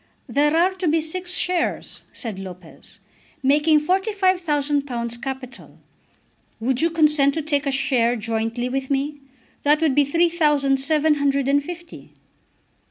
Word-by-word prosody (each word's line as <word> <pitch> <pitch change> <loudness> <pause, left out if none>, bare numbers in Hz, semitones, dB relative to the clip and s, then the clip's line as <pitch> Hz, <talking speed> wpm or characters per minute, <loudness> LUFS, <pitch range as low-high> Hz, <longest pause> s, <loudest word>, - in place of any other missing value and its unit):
"There 295 +3 +2
are 355 +3 +3
to 375 -2 -3
be 320 +1 +3
six 355 +3 -3
shares," 360 -1 -2
said 220 -6 -6
Lopez, 180 -3 -11 0.5
"making 300 +3 +4
£45,000 295 - 0
capital. 265 -1 -8 0.8
Would 250 +3 0
you 335 - +3
consent 300 -4 +3
to 320 - -1
take 290 -1 0
a - - +1
share 260 -3 +1
jointly 225 +2 -2
with 265 +1 -3
me? 285 +1 -2 0.4
That 295 +1 +3
would 315 -4 +2
be 290 - +4
three 335 +5 +2
thousand 295 -5 +2
seven 310 +2 +2
hundred 280 -1 +1
and 285 +1 +2
fifty." 345 +1 -10
285 Hz, 140 wpm, -22 LUFS, 265-325 Hz, 0.8 s, making